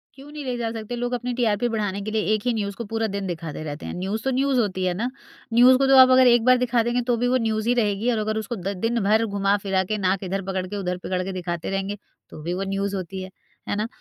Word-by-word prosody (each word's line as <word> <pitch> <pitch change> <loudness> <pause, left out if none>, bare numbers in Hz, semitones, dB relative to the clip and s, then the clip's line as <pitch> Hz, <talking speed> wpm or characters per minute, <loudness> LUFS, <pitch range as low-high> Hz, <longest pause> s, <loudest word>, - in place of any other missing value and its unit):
क्यों 280 +2 -13
नहीं 300 -1 -7
ले 250 -1 -2
जा 230 -1 -2
सकते? 225 +1 -5
लोग 245 +1 -2
अपनी 245 0 -2
टीआरपी 235 -2 +1
बढ़ाने 205 -3 -2
के 215 +2 -4
लिए 220 0 +1
एक 215 - 0
ही 245 - +2
न्यूज़ 200 -3 -3
को 235 - -6
पूरा 225 +1 -1
दिन 200 -1 -3
दिखाते 165 -3 -5
रहते 150 0 -6
हैं, - - -5
न्यूज़ 195 +5 -3
तो 265 - 0
न्यूज़ 265 0 +1
होती 190 -5 -1
है 180 - +1
ना? 230 +7 -2 0.4
न्यूज़ 250 +2 +7
को 270 0 +2
तो 270 - +6
आप 260 0 +9
अगर 255 0 +6
एक 240 -2 +5
बार 255 0 +6
दिखा 245 -2 +1
देंगे 240 +1 0
तो 245 - +3
भी 245 +2 +1
वो 255 +1 +3
न्यूज़ 220 0 -1
ही 245 - +4
रहेगी। 210 +2 +1
और 230 - 0
अगर 215 0 -1
उसको 220 +2 -3
द 195 0 -4
दिन 235 0 +1
भर 215 +3 +3
घुमा 200 -1 +1
फिरा 190 -1 +1
के 215 - +1
नाक 190 -1 0
इधर 195 +1 -2
पकड़ 190 -1 -2
के 205 +2 -5
उधर 180 -2 -2
पकड़ 185 -1 -1
के 190 - -4
दिखाते 175 -2 -4
रहेंगे 195 +1 -2 0.3
तो - - -10
भी 175 - -2
वो 190 +2 -2
न्यूज़ 200 0 -1
होती 190 0 -5
है, 185 - -7 0.4
है - - 0
ना? 215 +2 -1
215 Hz, 285 wpm, -24 LUFS, 195-240 Hz, 0.4 s, आप